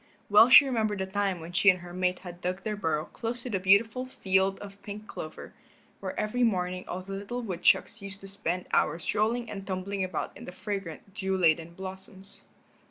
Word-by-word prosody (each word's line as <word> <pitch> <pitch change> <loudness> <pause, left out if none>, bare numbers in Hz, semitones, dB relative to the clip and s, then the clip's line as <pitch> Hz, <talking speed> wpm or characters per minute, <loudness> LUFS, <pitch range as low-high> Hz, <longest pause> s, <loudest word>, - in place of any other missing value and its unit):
Well 215 +4 +8
she 280 +4 +10
remembered 220 -5 0
the 190 - -1
time 195 -1 -1
when 165 +1 -8
she 185 +3 +5
and 180 -2 +3
her 175 0 -10
mate 180 0 0
had 175 0 -9
dug 185 +2 -3
their 215 -1 -2
burrow 160 -6 -1
close 235 +1 -5
to 250 - -5
the 195 - 0
beautiful 215 +7 +3
field 190 -5 +1
of 200 0 -11
pink 210 +1 -8
clover, 155 -6 -8 0.5
where - - -4
every 215 +4 -1
morning 185 -5 +1
all 180 - -4
the 195 +1 -8
little 205 +5 -4
woodchucks 210 +2 +2
used 200 0 -1
to 195 - -9
spend 185 -2 -3
hours 165 +2 +1
rolling 230 +3 +1
and 195 -2 -7
tumbling 190 +1 -2
about 185 -3 -3
in - - -10
the - - -7
fragrant, 195 -1 -6
dew 190 0 -1
laden 165 -1 +2
blossoms. 190 +1 -10
195 Hz, 200 wpm, -28 LUFS, 180-210 Hz, 0.5 s, she